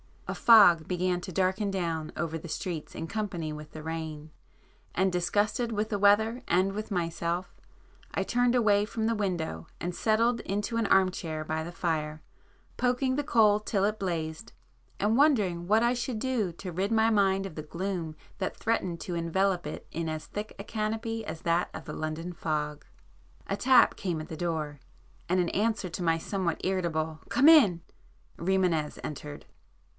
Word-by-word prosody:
A -, -, -2 dB
fog 180 Hz, -9 st, +7 dB
began 180 Hz, 0 st, 0 dB
to 185 Hz, -, -7 dB
darken 190 Hz, +3 st, +1 dB
down 165 Hz, -5 st, -2 dB
over 165 Hz, 0 st, -2 dB
the 165 Hz, -, -9 dB
streets 165 Hz, -2 st, -4 dB
in -, -, -4 dB
company 180 Hz, -5 st, -3 dB
with 150 Hz, 0 st, -9 dB
the 155 Hz, -, -8 dB
rain,—and 160 Hz, +3 st, -5 dB
disgusted 205 Hz, +6 st, 0 dB
with 215 Hz, +1 st, -1 dB
the 205 Hz, -, -1 dB
weather 220 Hz, +4 st, +4 dB
and 185 Hz, +3 st, +2 dB
with 215 Hz, +2 st, -5 dB
myself, 170 Hz, -1 st, -2 dB, 0.6 s
I -, -, 0 dB
turned 245 Hz, 0 st, +2 dB
away 210 Hz, -4 st, +4 dB
from 220 Hz, 0 st, -3 dB
the 230 Hz, -, +2 dB
window 175 Hz, -, -2 dB
and 175 Hz, +1 st, -2 dB
settled 230 Hz, +5 st, +2 dB
into 205 Hz, +4 st, -2 dB
an 225 Hz, -2 st, +1 dB
arm 190 Hz, -1 st, +4 dB
chair 160 Hz, -4 st, -4 dB
by 160 Hz, +1 st, -3 dB
the 170 Hz, -, -6 dB
fire, 155 Hz, -3 st, -2 dB, 0.5 s
poking 255 Hz, +1 st, +1 dB
the 290 Hz, +1 st, -1 dB
coal 215 Hz, -6 st, +4 dB
till 210 Hz, -2 st, -1 dB
it 210 Hz, +1 st, 0 dB
blazed, 165 Hz, 0 st, -3 dB, 0.5 s
and 215 Hz, +3 st, +2 dB
wondering 205 Hz, -, +3 dB
what 215 Hz, +3 st, +4 dB
I 240 Hz, +1 st, +3 dB
should 245 Hz, -1 st, -3 dB
do 220 Hz, -7 st, -1 dB
to 180 Hz, +2 st, -7 dB
rid 195 Hz, +6 st, -1 dB
my 220 Hz, 0 st, +4 dB
mind 195 Hz, -3 st, +2 dB
of 190 Hz, -, -7 dB
the 155 Hz, -, -4 dB
gloom 170 Hz, 0 st, -4 dB, 0.2 s
that 190 Hz, -, -2 dB
threatened 185 Hz, -7 st, -1 dB
to 175 Hz, -, -4 dB
envelop 175 Hz, +1 st, 0 dB
it 150 Hz, -, -7 dB
in 165 Hz, 0 st, -3 dB
as 155 Hz, -1 st, -4 dB
thick 210 Hz, +1 st, -6 dB
a 200 Hz, -, -6 dB
canopy 225 Hz, +2 st, -2 dB
[p -, -, -6 dB
75] -, -, -7 dB
as -, -, -21 dB
that 170 Hz, +1 st, +1 dB
of -, -, -7 dB
the -, -, -6 dB
London 155 Hz, +3 st, -4 dB
fog. 150 Hz, -3 st, -3 dB, 0.6 s
A 195 Hz, -, -1 dB
tap 250 Hz, +4 st, +5 dB
came 170 Hz, -5 st, -2 dB
at 155 Hz, -, -9 dB
the 160 Hz, -, -6 dB
door, 155 Hz, -4 st, -3 dB, 0.5 s
and 180 Hz, +1 st, +2 dB
in 175 Hz, -, 0 dB
answer 215 Hz, -2 st, 0 dB
to 180 Hz, -, -5 dB
my 165 Hz, -1 st, +2 dB
somewhat 175 Hz, 0 st, -2 dB
irritable 160 Hz, -4 st, -1 dB
"Come 275 Hz, +6 st, +5 dB
in!" 215 Hz, -, +6 dB, 0.6 s
Rimânez 175 Hz, -4 st, +1 dB
entered. 150 Hz, 0 st, -7 dB
185 Hz, 180 wpm, -29 LUFS, 165-215 Hz, 0.6 s, fog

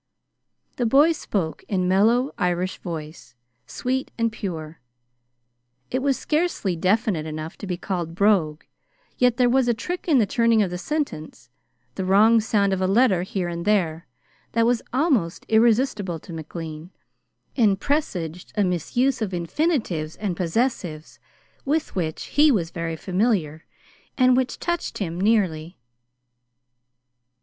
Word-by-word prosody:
The 245 Hz, -, +1 dB
boy 285 Hz, +7 st, +5 dB
spoke 195 Hz, -, -3 dB
in 190 Hz, -3 st, 0 dB
a -, -, 0 dB
mellow 225 Hz, +8 st, +3 dB
Irish 180 Hz, 0 st, -1 dB
voice, 155 Hz, -6 st, -8 dB, 0.3 s
sweet 260 Hz, +10 st, -2 dB
and 230 Hz, -1 st, +1 dB
pure. 165 Hz, -7 st, -6 dB, 1.1 s
It 260 Hz, -, 0 dB
was 275 Hz, -1 st, +1 dB
scarcely 305 Hz, -, -1 dB
definite 185 Hz, -2 st, +1 dB
enough 155 Hz, +1 st, -6 dB
to 200 Hz, -, -7 dB
be 180 Hz, -1 st, -2 dB
called 175 Hz, -3 st, -4 dB
brogue, 180 Hz, -6 st, +2 dB, 0.6 s
yet 250 Hz, -1 st, +3 dB
there 250 Hz, -1 st, +4 dB
was 255 Hz, 0 st, +3 dB
a 240 Hz, -, +2 dB
trick 355 Hz, +11 st, -5 dB
in 305 Hz, -5 st, +4 dB
the 225 Hz, -, +4 dB
turning 230 Hz, +1 st, +3 dB
of 185 Hz, -, -3 dB
the 180 Hz, -, -3 dB
sentence, 160 Hz, -, -4 dB, 0.4 s
the 190 Hz, -, -4 dB
wrong 210 Hz, +5 st, +5 dB
sound 205 Hz, -2 st, +1 dB
of 190 Hz, -, -1 dB
a 185 Hz, -, +2 dB
letter 195 Hz, -2 st, +3 dB
here 185 Hz, 0 st, -3 dB
and 170 Hz, 0 st, -4 dB
there, 170 Hz, -6 st, 0 dB, 0.5 s
that 230 Hz, 0 st, +3 dB
was 240 Hz, 0 st, +2 dB
almost 250 Hz, -, 0 dB
irresistible 220 Hz, -5 st, +2 dB
to 170 Hz, +2 st, -11 dB
McLean, 160 Hz, 0 st, -7 dB, 0.7 s
and 210 Hz, -6 st, +3 dB
presaged 180 Hz, -, -2 dB
a 205 Hz, -, +4 dB
misuse 235 Hz, -, 0 dB
of 195 Hz, -4 st, -2 dB
infinitives 175 Hz, -, -1 dB
and 200 Hz, -4 st, -3 dB
possessives 175 Hz, -4 st, -2 dB, 0.4 s
with 305 Hz, -1 st, -1 dB
which 160 Hz, -4 st, -2 dB
he 295 Hz, +1 st, +4 dB
was 175 Hz, -9 st, 0 dB
very 165 Hz, -1 st, -3 dB
familiar 180 Hz, -4 st, -1 dB, 0.5 s
and 255 Hz, -1 st, +5 dB
which 260 Hz, 0 st, 0 dB
touched 345 Hz, 0 st, -3 dB
him 175 Hz, -3 st, -3 dB
nearly. 185 Hz, -6 st, +1 dB
195 Hz, 140 wpm, -23 LUFS, 170-245 Hz, 1.1 s, boy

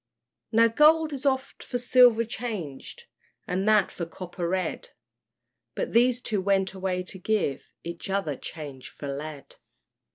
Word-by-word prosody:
Now 230 Hz, 0 st, +6 dB
gold 310 Hz, +6 st, +4 dB
is 280 Hz, +1 st, -2 dB
oft 265 Hz, 0 st, -1 dB
for 250 Hz, -, -3 dB
silver 245 Hz, -2 st, +5 dB
changed, 210 Hz, -, -6 dB, 0.4 s
And 190 Hz, +3 st, -1 dB
that 210 Hz, -3 st, +4 dB
for 170 Hz, -, -5 dB
copper 175 Hz, 0 st, -5 dB
red; 185 Hz, -2 st, -2 dB, 0.9 s
But -, -, -3 dB
these 245 Hz, +1 st, +4 dB
two 210 Hz, -4 st, -1 dB
went 195 Hz, 0 st, +1 dB
away 185 Hz, -1 st, -2 dB
to 190 Hz, +1 st, -7 dB
give 190 Hz, -8 st, -1 dB
Each 170 Hz, +2 st, -6 dB
other 190 Hz, -7 st, -1 dB
change 140 Hz, -3 st, -8 dB
for 145 Hz, -, -8 dB
lead. 145 Hz, +1 st, -7 dB
195 Hz, 140 wpm, -27 LUFS, 170-240 Hz, 0.9 s, Now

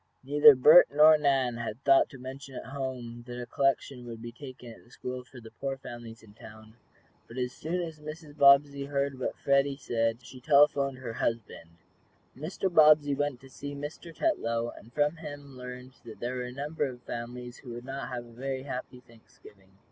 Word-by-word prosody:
Neither 145 Hz, +1 st, +7 dB
Bert 150 Hz, +7 st, +8 dB
nor 155 Hz, +2 st, +7 dB
Nan 135 Hz, -5 st, +1 dB
had 115 Hz, +2 st, -6 dB
thought 135 Hz, -1 st, +5 dB
to 135 Hz, -, -11 dB
mention 135 Hz, +1 st, -9 dB
at -, -, -7 dB
home 125 Hz, -4 st, -5 dB
that 120 Hz, 0 st, -6 dB
a 120 Hz, -, -5 dB
collection 135 Hz, 0 st, -1 dB
would 115 Hz, -1 st, -7 dB
be 120 Hz, +1 st, -8 dB
taken 130 Hz, -1 st, -11 dB
at -, -, -17 dB
the -, -, -23 dB
school 125 Hz, 0 st, -6 dB
for 125 Hz, +1 st, -14 dB
the 110 Hz, -1 st, -13 dB
poor 135 Hz, -1 st, -4 dB
families 120 Hz, -3 st, -10 dB
in 105 Hz, -2 st, -16 dB
the -, -, -29 dB
town. 110 Hz, 0 st, -13 dB, 0.5 s
But 115 Hz, -, -11 dB
as 125 Hz, -1 st, -1 dB
soon 170 Hz, +4 st, -3 dB
as 160 Hz, -2 st, -7 dB
Mrs. 155 Hz, 0 st, -9 dB
Bobbsey 140 Hz, 0 st, +5 dB
heard 140 Hz, -1 st, -2 dB
what -, -, -3 dB
Freddie 140 Hz, 0 st, +2 dB
said 115 Hz, -3 st, -1 dB
she 130 Hz, -, -12 dB
telephoned 140 Hz, -1 st, +4 dB
to 130 Hz, -, -14 dB
her 115 Hz, -2 st, -5 dB
husband. 115 Hz, -8 st, -3 dB, 0.7 s
Mr. 170 Hz, +5 st, -3 dB
Bobbsey 150 Hz, -2 st, +6 dB
went 145 Hz, -2 st, -1 dB
to 135 Hz, -, -14 dB
see 145 Hz, +1 st, -7 dB
Mr. 145 Hz, +4 st, -7 dB
Tetlow, 120 Hz, -, -1 dB
and 115 Hz, -, -15 dB
from 150 Hz, +4 st, +1 dB
him 145 Hz, -4 st, -9 dB
learned 125 Hz, 0 st, -9 dB
that 115 Hz, -2 st, -11 dB
there 120 Hz, +1 st, -3 dB
were 125 Hz, -, -3 dB
a 125 Hz, -, -7 dB
number 145 Hz, +3 st, -3 dB
of 125 Hz, -2 st, -10 dB
families 120 Hz, +1 st, -7 dB
who 125 Hz, -3 st, -9 dB
would 120 Hz, +1 st, -8 dB
not 135 Hz, +1 st, -5 dB
have 120 Hz, -1 st, -5 dB
a 120 Hz, -, -15 dB
very 130 Hz, +2 st, -4 dB
happy 125 Hz, -2 st, -6 dB
Thanksgiving. 110 Hz, -4 st, -19 dB
130 Hz, 200 wpm, -29 LUFS, 120-145 Hz, 0.7 s, Bert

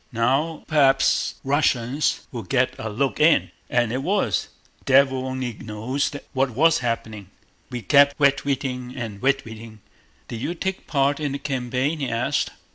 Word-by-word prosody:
Now 135 Hz, +7 st, 0 dB
p'waps 140 Hz, -4 st, +3 dB
Wussians 135 Hz, -1 st, +1 dB
will 120 Hz, -, -5 dB
get 125 Hz, +5 st, +1 dB
a 110 Hz, -, -4 dB
look 135 Hz, +8 st, -1 dB
in. 155 Hz, +1 st, +4 dB, 0.2 s
As 120 Hz, -2 st, +1 dB
it 130 Hz, +2 st, -2 dB
was, 195 Hz, +7 st, 0 dB, 0.4 s
devil 135 Hz, -1 st, +3 dB
only 130 Hz, -2 st, -3 dB
knows 110 Hz, +7 st, -3 dB, 0.2 s
what 135 Hz, 0 st, +1 dB
was 160 Hz, +7 st, +3 dB
happening. 110 Hz, -5 st, -4 dB, 0.4 s
We 120 Hz, -2 st, -6 dB
kept 140 Hz, -1 st, +5 dB
wetweating 135 Hz, -3 st, 0 dB
and 110 Hz, -5 st, -6 dB
wetweating. 115 Hz, -5 st, -2 dB, 0.5 s
Did 115 Hz, -, -6 dB
you 170 Hz, +7 st, -3 dB
take 190 Hz, +2 st, -4 dB
part 140 Hz, 0 st, +1 dB
in 145 Hz, -3 st, -2 dB
the -, -, -2 dB
campaign?" 135 Hz, +2 st, -2 dB
he 135 Hz, -, -2 dB
asked. 125 Hz, +5 st, 0 dB
135 Hz, 145 wpm, -23 LUFS, 120-140 Hz, 0.5 s, kept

